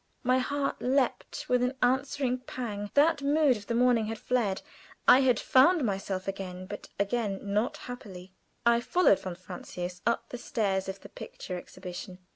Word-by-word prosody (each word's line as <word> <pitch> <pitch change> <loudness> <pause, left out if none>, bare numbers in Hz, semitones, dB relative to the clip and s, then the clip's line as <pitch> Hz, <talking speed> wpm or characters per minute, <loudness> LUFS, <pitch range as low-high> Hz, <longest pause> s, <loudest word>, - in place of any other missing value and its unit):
My 255 +1 +3
heart 280 +2 -1
leaped 260 0 0
with 250 0 +2
an 250 +2 0
answering 260 0 +1
pang. 220 -5 -5
That 295 +1 +4
mood 285 -1 +3
of 205 -2 -9
the 235 - -1
morning 240 -2 +3
had 225 0 -4
fled. 215 -5 0 0.4
I 255 - +9
had 255 -4 +3
"found 290 +5 +5
myself 195 -3 -2
again," 185 -1 -5
but 205 +2 -8
again 200 -1 0
not 205 +3 0
"happily." 190 -7 -9 0.3
I 235 0 +5
followed 350 - +4
von 185 -2 -5
Francius 180 0 -7
up 235 0 0
the 245 - -6
stairs 195 -7 -1
of 190 +1 -6
the - - -11
picture 180 - -7
exhibition. 180 0 -8
235 Hz, 165 wpm, -29 LUFS, 195-255 Hz, 0.4 s, I